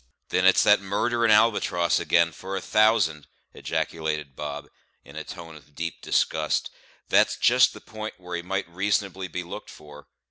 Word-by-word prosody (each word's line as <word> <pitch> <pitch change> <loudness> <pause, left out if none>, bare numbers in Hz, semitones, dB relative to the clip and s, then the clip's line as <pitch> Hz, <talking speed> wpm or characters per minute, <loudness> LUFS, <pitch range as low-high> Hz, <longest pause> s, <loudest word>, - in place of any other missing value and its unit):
"Then 90 +1 +2
it's 95 - +5
that 105 -1 +5
murderin' 115 +4 0
Albatross 105 -6 +3
again, 85 -1 +2
for 95 +4 -7
a - - -1
thousand," 105 -9 +2 0.3
ejaculated 80 -3 -3
Bob, 75 0 -6 0.4
in 70 - -14
a 80 - -5
tone 80 0 -10
of 75 -1 -18
deep 85 0 -5
disgust. 80 -1 0 0.4
"That's - - +3
just 125 +1 +4
the - - -12
p'int 110 -2 -8
where 90 -1 -7
he 85 - -3
might 95 +2 -3
reasonably 95 +1 -2
be 90 0 -5
looked 85 - -9
for. 75 -1 -14
90 Hz, 165 wpm, -25 LUFS, 80-100 Hz, 0.4 s, it's